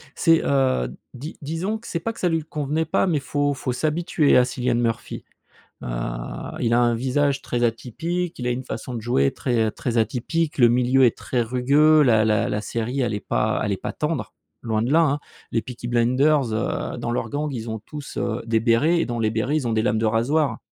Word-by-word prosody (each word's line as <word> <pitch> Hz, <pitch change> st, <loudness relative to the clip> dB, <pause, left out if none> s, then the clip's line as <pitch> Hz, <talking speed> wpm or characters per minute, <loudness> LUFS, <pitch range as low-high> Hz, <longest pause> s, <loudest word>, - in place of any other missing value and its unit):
C'est, 165 Hz, -2 st, +4 dB
heu, 130 Hz, -, +1 dB, 0.2 s
di 140 Hz, +6 st, -8 dB
disons 165 Hz, +9 st, -2 dB
que 230 Hz, -, -13 dB
c'est 170 Hz, -, -2 dB
pas 230 Hz, +7 st, -3 dB
que -, -, -13 dB
ça 180 Hz, -, +1 dB
lui 165 Hz, -1 st, 0 dB
convenait 150 Hz, +1 st, -2 dB
pas 175 Hz, -, +1 dB
mais 160 Hz, -5 st, +1 dB
faut 145 Hz, +2 st, 0 dB
faut 130 Hz, -1 st, -3 dB
s'habituer 155 Hz, 0 st, +2 dB
à 125 Hz, -, +5 dB
Cilian 125 Hz, -1 st, -1 dB
Murphy. 115 Hz, -1 st, -2 dB, 0.6 s
Heu, -, -, -5 dB, 0.7 s
Il 115 Hz, -1 st, +1 dB
a 120 Hz, -, +4 dB
un 120 Hz, -1 st, +3 dB
visage 135 Hz, +3 st, 0 dB
très 120 Hz, 0 st, -2 dB
atypique, 160 Hz, +10 st, -2 dB
il 125 Hz, -, -2 dB
a 125 Hz, -, +1 dB
une 125 Hz, +2 st, -3 dB
façon 125 Hz, 0 st, -6 dB
de 115 Hz, -, -4 dB
jouer 70 Hz, -, +2 dB
très, 120 Hz, -4 st, 0 dB
heu -, -, -2 dB
très 120 Hz, +1 st, -3 dB
atypique. 140 Hz, +8 st, -1 dB
Le 120 Hz, -3 st, +6 dB
milieu 125 Hz, +2 st, +3 dB
est 120 Hz, -, +2 dB
très 125 Hz, -, -1 dB
rugueux, 140 Hz, +6 st, +4 dB
la 110 Hz, -5 st, +4 dB
la 105 Hz, -1 st, +2 dB
la 105 Hz, -, -1 dB
série 120 Hz, +5 st, -2 dB
elle 120 Hz, -3 st, 0 dB
est 105 Hz, -, -2 dB
pas 110 Hz, +1 st, 0 dB
elle 105 Hz, -, -1 dB
est 95 Hz, -, -1 dB
pas -, -, -5 dB
tendre, 150 Hz, -1 st, -3 dB, 0.3 s
loin 110 Hz, -2 st, 0 dB
de 120 Hz, +4 st, 0 dB
là, 165 Hz, +2 st, +5 dB
hein, 145 Hz, -2 st, +2 dB, 0.3 s
les 115 Hz, -, +1 dB
Peaky 120 Hz, 0 st, -7 dB
Blinders, 125 Hz, +2 st, +2 dB
heu, 110 Hz, +2 st, -2 dB
dans 120 Hz, 0 st, -3 dB
leurs 115 Hz, -2 st, -2 dB
gangs, 145 Hz, +3 st, -2 dB
ils 115 Hz, -3 st, -5 dB
ont 110 Hz, 0 st, -4 dB
tous, 145 Hz, +6 st, -9 dB
heu, 115 Hz, +1 st, -1 dB
des 115 Hz, -1 st, +2 dB
bérets 125 Hz, +9 st, +3 dB
et -, -, +1 dB
dans 120 Hz, -1 st, -3 dB
les 110 Hz, -1 st, +1 dB
bérets, 120 Hz, +6 st, -1 dB
ils 135 Hz, -6 st, -2 dB
ont 115 Hz, -, 0 dB
des 110 Hz, -, +2 dB
lames 110 Hz, -1 st, +1 dB
de 115 Hz, -, 0 dB
rasoir 120 Hz, +4 st, +1 dB
125 Hz, 230 wpm, -23 LUFS, 115-150 Hz, 0.7 s, Le